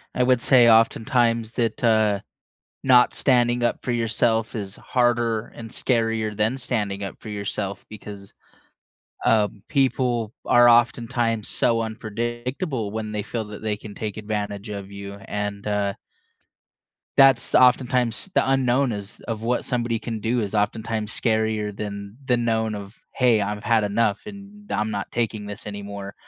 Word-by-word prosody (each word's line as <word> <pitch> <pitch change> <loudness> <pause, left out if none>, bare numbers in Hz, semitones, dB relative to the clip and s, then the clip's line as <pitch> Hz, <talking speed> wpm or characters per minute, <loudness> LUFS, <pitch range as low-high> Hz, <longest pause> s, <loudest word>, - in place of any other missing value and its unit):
I 125 - +2
would 125 -1 +3
say 120 -2 +6
oftentimes 115 0 +3
that, 115 -2 -2
uh, 110 -3 +3 0.6
not 125 -2 +5
standing 120 -2 +3
up 120 - 0
for - - -3
yourself 115 -1 +1
is 100 -3 -4
harder 120 -3 0
and 115 -1 -8
scarier 115 -4 0
than 110 +4 +2
standing 105 -6 -2
up 100 - -5
for 110 - -8
yourself 100 -1 -4
because, 100 -2 -10 0.9
um, 105 -2 +2
people 125 -5 +1
are 120 0 +6
oftentimes 120 -2 +2
so 115 -1 +2
unpredictable 120 - -4
when 110 0 -4
they 105 -1 -2
feel 110 +1 -4
that 105 0 -10
they 110 -1 0
can 105 -1 -10
take 105 -2 -5
advantage 105 -1 -4
of 100 -1 -6
you, 100 0 -8
and, 105 -1 -4
uh 100 -1 0 1.2
that's 135 -3 +5
oftentimes 125 - +3
the - - +3
unknown 135 0 +2
is 100 -2 -7
of 110 -2 -3
what 120 +1 0
somebody 120 -3 -1
can 115 -1 -5
do 115 +3 0
is 105 -1 -4
oftentimes 110 +1 -1
scarier 110 -2 0
than 100 +1 -6
the 125 - +3
known 110 -2 0
of, 100 +1 -9 0.2
"Hey, 125 -4 +4
I've 105 +1 -3
had 115 -2 +3
enough, 105 0 +1
and 205 0 -11
I'm 110 +1 -1
not 100 -1 -4
taking 110 -3 -2
this 105 0 -8
anymore." 100 -1 -7
110 Hz, 150 wpm, -23 LUFS, 105-120 Hz, 1.2 s, say